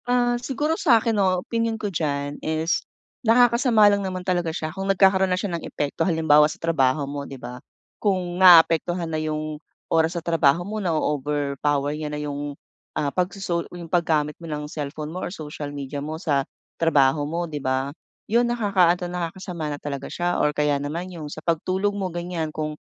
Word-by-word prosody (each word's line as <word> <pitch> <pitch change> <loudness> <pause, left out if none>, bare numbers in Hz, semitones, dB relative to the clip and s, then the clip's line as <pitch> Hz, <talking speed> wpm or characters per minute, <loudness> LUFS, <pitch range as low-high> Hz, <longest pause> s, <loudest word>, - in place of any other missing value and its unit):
Ah, 245 0 +2
siguro 290 +5 -1
sa 255 -9 +6
akin 225 +1 0
'no 185 -3 +1
opinyon 230 -1 -1
ko 205 -3 -4
diyan 145 -3 -2
is, 160 +2 0 0.4
nakakasama 235 -1 +5
lang 205 0 +4
naman 185 -2 -4
talaga 175 -3 0
siya 155 -1 -4
kung 195 0 -4
nagkakaroon 190 0 +4
na 180 - +1
siya 195 -2 -3
ng 170 - -2
epekto 145 +2 -4
halimbawa 160 -3 +4
sa - - -7
trabaho 145 -3 +1
mo, 140 0 -6
'di 135 - -8
ba. 125 0 -8 0.4
Kung 185 -3 0
naapektuhan 175 -1 +6
na 155 - -1
'yung 155 -1 -3 0.3
oras 165 +1 +2
sa 170 - -5
trabaho 165 0 +3
mo 215 +2 -4
na-o-overpower 145 -3 0
niya 150 0 -4
na 150 - -4
'yung 145 -1 -4 0.4
ah 145 - 0
pagsoso 180 -2 -1
yung 175 -1 -8
paggamit 160 -3 +1
mo 165 - -8
ng 150 0 -3
cellphone 150 +1 -5
mo 185 - -4
or - - -3
social 150 -4 -6
media 140 0 -5
mo 155 +2 -4
sa 145 -6 +1 0.4
trabaho 145 -3 +4
mo 170 +2 -2
'di 150 -3 -6
ba. 130 +1 -1 0.3
'Yun 240 +2 +2
nakakaano 190 -7 +2
nakakasama 175 -2 -4
na 145 - -3
talaga 140 -2 -5
siya 175 0 -1
or - - +3
kaya 150 -1 0
naman 170 +6 -4
'yung 155 -3 -7
sa 155 +2 -9
pagtulog 185 +5 0
mo 195 -2 -2
ganiyan, 170 -2 -3
kung 155 0 -4
165 Hz, 185 wpm, -24 LUFS, 150-185 Hz, 0.4 s, sa